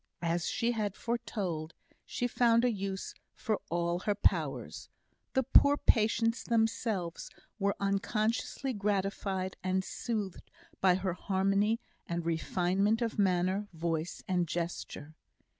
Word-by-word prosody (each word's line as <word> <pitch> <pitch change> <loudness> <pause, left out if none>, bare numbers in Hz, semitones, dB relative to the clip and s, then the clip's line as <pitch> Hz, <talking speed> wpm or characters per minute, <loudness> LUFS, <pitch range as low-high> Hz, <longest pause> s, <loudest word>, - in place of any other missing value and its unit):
As 170 0 0
she 235 +1 +1
had 210 -4 -2
foretold, 185 -9 -3 0.3
she 245 - -2
found 235 -1 +4
a 245 - +3
use 195 -2 -4 0.2
for 215 -2 -1
all 170 +1 0
her 205 +3 0
powers. - - 0 0.4
The 265 - +3
poor 285 +3 +6
patients 230 0 +2
themselves 220 -6 0 0.3
were 200 0 +1
unconsciously 215 +6 0
gratified 195 -2 -1
and 190 0 +1
soothed 210 -3 -4 0.3
by 185 -2 +5
her 185 -1 -1
harmony 195 +4 +1 0.3
and 170 -1 -2
refinement 185 +6 +1
of 225 -2 -2
manner, 190 +1 +2
voice, 165 0 -2
and 180 -2 +1
gesture. 165 -2 -4
195 Hz, 120 wpm, -31 LUFS, 180-225 Hz, 0.4 s, poor